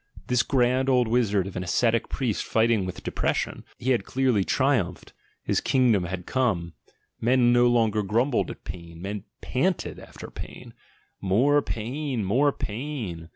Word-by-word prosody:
This 125 -1 +2
grand 130 0 +2
old 125 -3 +3
wizard 110 -5 +2
of 95 - -7
an 90 - -2
ascetic 115 +5 +1
priest 125 -6 -1
fighting 110 -4 +2
with 90 - -7
de - - -3
pression - - -1
— - - -29
he 130 - -1
had 120 -6 +2
clearly 125 -4 +1
triumphed, 120 -8 0 0.3
his - - 0
kingdom 120 -8 +3
had 90 0 -5
come: 90 -11 0 0.5
men 120 0 +4
no 120 0 +5
longer 110 -3 +2
grumbled 115 +6 +1
at - - -9
pain, 85 -2 -9
men 100 +2 -5 0.2
panted - - -1
after - - -11
pain: - - -9 0.5
"More 125 +10 +3
pain! 125 0 -3
More 135 +9 +3
pain!" 110 - -5
115 Hz, 155 wpm, -26 LUFS, 95-130 Hz, 0.5 s, no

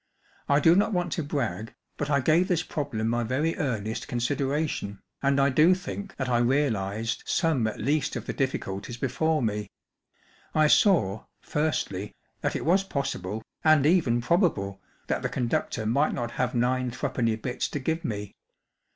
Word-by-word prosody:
I 140 0 +5
do 165 +3 +6
not 205 +3 +2
want 175 -2 0
to 165 - -1
brag, 140 -6 -3 0.2
but 145 - -3
I 140 -2 +3
gave 165 +6 +3
this 180 -4 +1
problem 115 -7 -3
my 120 +1 +1
very 140 +8 0
earnest 110 - -2
considera¬ 140 +4 0
tion, 100 -7 -5 0.2
and 140 0 +2
I 140 0 +4
do 155 +7 +5
think 195 +2 -7
that 130 - -3
I 120 -1 +2
realized 115 -5 0
some 155 -10 +2
at 110 - -5
least 145 +4 0
of - - -4
the - - -3
difficulties 115 -4 -3
before 150 +4 0
me. 105 -2 -2 0.9
I 155 0 +5
saw, 150 - +3 0.2
firstly, 105 -10 -2 0.3
that - - -1
it - - -3
was 185 +4 +4
possible 110 - -3 0.2
and 155 -3 +5
even 150 -8 +3
probable 115 - +1 0.2
that - - -1
the - - -1
conductor 115 -2 -1
might 140 +8 +2
not 120 -2 -3
have 125 0 -1
nine 125 +1 +1
threepenny 125 -2 -1
bits 120 +3 -3
to - - -4
give 160 +5 -2
me. 105 - -4
135 Hz, 170 wpm, -27 LUFS, 115-155 Hz, 0.9 s, do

